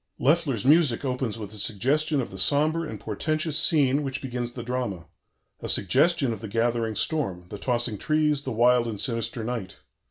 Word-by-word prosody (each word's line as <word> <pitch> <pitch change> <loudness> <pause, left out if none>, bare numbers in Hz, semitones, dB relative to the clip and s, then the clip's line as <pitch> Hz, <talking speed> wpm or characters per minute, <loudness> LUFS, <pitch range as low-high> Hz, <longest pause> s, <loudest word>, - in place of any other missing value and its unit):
Loeffler's 140 -6 +1
music 145 -4 +4
opens 125 -4 -2
with 105 -2 -7
a 105 - -5
suggestion 140 +10 +2
of 120 - -6
the 95 - -8
sombre 155 - +2
and - - -7
portentous 155 -1 -2
scene 145 -3 +3
which 135 -1 -3
begins 125 -2 -4
the 120 - -6
drama; 120 -8 -3 0.5
a - - -5
suggestion 135 - +2
of 110 - -7
the 110 - -6
gathering 115 0 0
storm, 100 - -2
the 105 - -7
tossing 120 -4 -1
trees, 150 -2 +1
the 135 - -5
wild 120 +1 +3
and 110 -3 -5
sinister 115 -1 -2
night. 110 -5 -5
125 Hz, 180 wpm, -25 LUFS, 115-145 Hz, 0.5 s, music